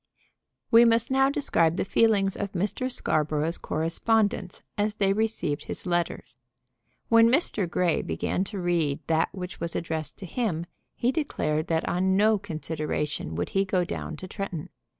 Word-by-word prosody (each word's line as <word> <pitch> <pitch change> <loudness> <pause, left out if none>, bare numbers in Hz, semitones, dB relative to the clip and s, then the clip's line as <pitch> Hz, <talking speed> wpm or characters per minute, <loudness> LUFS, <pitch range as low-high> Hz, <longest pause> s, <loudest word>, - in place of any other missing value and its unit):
We 230 0 +8
must 230 +1 +3
now 270 0 +4
describe 170 - +1
the - - 0
feelings 200 -2 +3
of 200 -1 -4
Mr. 210 +8 -1
Scarborough's 155 -4 0
correspondents 200 +5 0
as 210 0 0
they 195 -2 +2
received 215 -9 -1
his - - -5
letters. 175 -7 -2 0.7
When 230 0 +6
Mr. 235 - +1
Grey 175 -1 +1
begun 85 - -1
to 200 +1 -6
read 170 -6 0
that 160 0 +2
which 180 -2 -7
was 170 0 -4
addressed 160 -3 -3
to 195 - -8
him 175 -4 -2 0.3
he 245 - +1
declared 155 - -1
that 160 -1 0
on 190 +2 +2
no 215 +1 +4
consideration 155 - -3
would 85 - -2
he 195 - +2
go 185 -2 0
down 160 - -5
to 185 - -8
Tretton. 180 -3 -5
185 Hz, 155 wpm, -27 LUFS, 160-215 Hz, 0.7 s, We